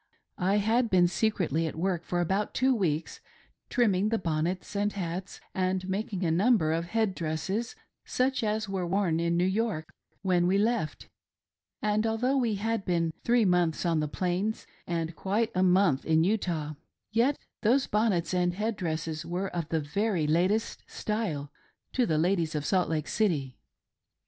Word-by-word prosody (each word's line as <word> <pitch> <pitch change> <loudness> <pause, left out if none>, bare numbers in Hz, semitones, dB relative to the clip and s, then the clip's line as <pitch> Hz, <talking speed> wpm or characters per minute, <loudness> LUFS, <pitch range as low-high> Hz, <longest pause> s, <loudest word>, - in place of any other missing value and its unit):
I 190 +3 +2
had 225 +3 +2
been 180 -3 +5
secretly 175 -5 0
at - - -5
work 175 0 -1
for 175 0 0
about 195 +4 -1
two 260 +1 +3
weeks, 165 -8 -1 0.5
trimming 210 -5 +2
the 225 - +1
bonnets 175 +2 -2
and 205 +1 +1
hats, 185 0 -5
and 185 0 -1
making 195 -1 -2
a 165 - +2
number 185 -2 +3
of 165 +1 -1
head 220 +2 0
dresses, 185 - -3 0.3
such 260 -1 0
as 215 0 0
were 190 -2 -2
worn 175 -3 +1
in 170 0 +1
New 175 - +3
York 190 -5 -1 0.3
when 180 -2 +2
we 190 +2 +3
■ - - +2
left; 215 -8 -1 0.8
and, 215 +1 +2
although 240 +5 +1
we 235 -5 +1
had 220 +1 -1
been 170 -3 0
three 240 -2 +3
months 180 -3 +2
on 165 -2 +2
the 150 - 0
Plains, 185 +7 -2 0.2
and 165 -1 -2
quite 215 +7 0
a 185 - +1
month 180 -6 +4
in 160 0 +3
Utah, 170 -6 -1 0.4
yet 240 +6 +2 0.2
those 255 +5 +3
bonnets 200 -6 +1
and 175 -1 +1
head 215 +2 -2
dresses 160 -3 -3
were 180 +3 -3
of 165 -2 -3
the 165 - +1
very 180 +3 0
latest 185 +9 +1
style 175 -10 -3 0.4
to 250 -2 +2
the 155 - +1
ladies 165 -1 +1
of 150 -1 -2
Salt 185 +1 +2
Lake 155 -2 -1
City. 155 - 0
185 Hz, 170 wpm, -28 LUFS, 165-215 Hz, 0.8 s, been